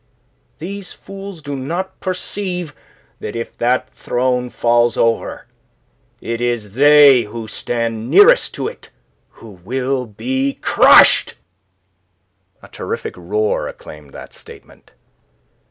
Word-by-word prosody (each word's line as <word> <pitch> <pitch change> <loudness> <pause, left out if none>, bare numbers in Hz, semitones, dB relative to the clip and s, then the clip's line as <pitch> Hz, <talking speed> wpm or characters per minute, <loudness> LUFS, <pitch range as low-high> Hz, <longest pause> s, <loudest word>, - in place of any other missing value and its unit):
These 190 +3 -7
fools 195 -4 -10
do 145 -1 -5
not 170 +8 -5
perceive 180 -3 -4 0.5
that - - -6
if 115 0 -6
that 125 +1 +1
throne 125 0 -1
falls 120 -1 +1
over, 115 0 -1 0.7
it 115 0 -4
is 120 -4 -2
they 145 0 +7
who 110 +1 -7
stand 115 0 -3
nearest 480 +5 +5
to - - -3
it 475 - -10 0.4
who 115 - -15
will 130 +3 -2
be 130 +6 -2
crushed." - - +5 1.3
A - - -12
terrific - - -6
roar 105 +5 -2
acclaimed 75 -2 -12
that - - -11
statement. - - -15
125 Hz, 110 wpm, -18 LUFS, 115-155 Hz, 1.3 s, they